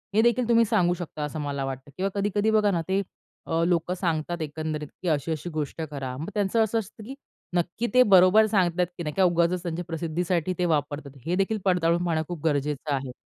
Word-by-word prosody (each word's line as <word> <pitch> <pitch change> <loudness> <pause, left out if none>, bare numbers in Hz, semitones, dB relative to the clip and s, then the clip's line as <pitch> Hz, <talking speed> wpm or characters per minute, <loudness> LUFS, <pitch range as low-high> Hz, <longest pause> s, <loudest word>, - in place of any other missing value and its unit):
हे 220 - +6
देखील 235 +1 +2
तुम्ही 230 0 +6
सांगू 185 -5 +2
शकता, 175 -4 -6
असं 150 +1 -4
मला 140 -1 -3
वाटतं. 135 +1 -6
किंवा 195 +1 0
कधी-कधी 205 +2 +1
बघा 210 -2 +3
ना, 170 -2 0
ते 190 +1 +1 0.4
अ, 165 0 0
लोकं 175 0 +1
सांगतात 170 -2 -2
एकंदरीत 155 0 -4
की 185 - -4
अशी-अशी 155 +3 -1
गोष्ट 155 +1 -3
करा. 130 -3 -4
मग 155 - -5
त्यांचं 210 +2 +2
असं 225 +1 0
असतं 215 +1 -9
की 265 +5 -8 0.4
नक्की 175 +7 -1
ते 255 0 +7
बरोबर 195 +2 +6
सांगतात 180 -4 +2
की 175 - -4
नाही 150 -1 -3
किंवा 190 -2 +5
उगाचच 170 +1 +1
त्यांच्या 170 0 -4
प्रसिद्धीसाठी 170 +1 -1
ते 180 - +2
वापरतात. 145 -3 -2
हे 175 +2 0
देखील 195 +3 +1
पडताळून 175 -2 +2
पाहणं 160 -2 0
खूप 175 -4 -6
गरजेचं 145 0 0
आहे. 135 -1 -4
175 Hz, 205 wpm, -26 LUFS, 155-195 Hz, 0.4 s, ते